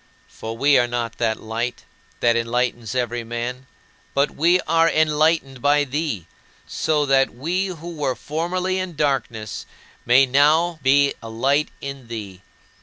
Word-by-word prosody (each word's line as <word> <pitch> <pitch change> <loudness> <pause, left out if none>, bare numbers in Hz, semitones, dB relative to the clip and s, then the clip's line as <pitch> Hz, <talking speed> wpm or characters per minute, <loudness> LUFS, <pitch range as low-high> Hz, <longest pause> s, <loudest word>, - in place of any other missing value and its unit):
For 115 +1 -7
we 140 +2 +5
are 120 - +2
not 120 -1 -4
that 110 -2 0
Light 115 +2 -4 0.4
that 120 -1 +4
enlightens 120 0 -1
every 120 -1 -1
man, 120 +3 -5 0.5
but 140 +1 +2
we 175 +4 +3
are 165 +1 +3
enlightened 155 -4 +1
by 145 +2 +3
thee, 140 - -3 0.4
so 150 -2 0
that 135 -2 +2
we 175 +9 -1
who 170 -1 -7
were 135 -4 -1
formerly 180 +4 -2
in 185 -3 -4
darkness 125 -7 -2 0.4
may 125 +3 +5
now 155 +6 +3
be 140 +1 +4
alight 135 +6 0
in 140 -3 -7
thee. 100 -5 -7
135 Hz, 140 wpm, -22 LUFS, 120-155 Hz, 0.5 s, we